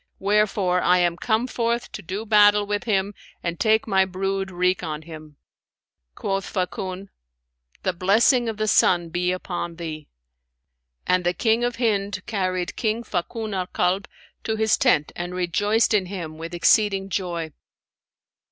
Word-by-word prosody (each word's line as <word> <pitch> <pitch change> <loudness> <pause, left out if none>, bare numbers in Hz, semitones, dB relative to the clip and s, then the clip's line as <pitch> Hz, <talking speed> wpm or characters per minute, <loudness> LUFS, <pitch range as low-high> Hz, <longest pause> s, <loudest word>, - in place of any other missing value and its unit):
Wherefore 195 -3 +1
I 180 - +4
am 175 -1 +2
come 220 +5 0
forth 235 -1 -2
to - - -7
do 200 +4 -5
battle 205 -1 +5
with 205 +1 -2
him 200 -2 0 0.3
and 170 0 -3
take 220 0 +2
my 190 -2 +4
brood 195 +1 -2
wreak 180 0 0
on 155 -2 -5
him.' 155 -2 -11 0.8
Quoth 195 0 -2
Fakun, 185 0 -3 0.7
'The 185 - 0
blessing 225 +7 +3
of 220 - -5
the 215 0 -1
sun 175 -4 +3
be 175 +2 0
upon 175 -2 -4
thee!'; 155 -3 -7 1.0
and 180 0 +2
the 175 +1 0
King 225 +1 +2
of 245 0 0
Hind 200 -5 -1
carried 185 -4 -2
King 225 +1 -1
Fakun 215 +2 -3
al 185 -1 -2
Kalb 185 +3 0 0.4
to 220 - -1
his 220 0 +3
tent 190 - +2
and 175 +1 -5
rejoiced 205 +6 +1
in 195 -3 +2
him 165 -5 -6
with 165 +2 -6
exceeding 195 +2 +3
joy. 170 -5 -3
190 Hz, 150 wpm, -23 LUFS, 175-215 Hz, 1.0 s, battle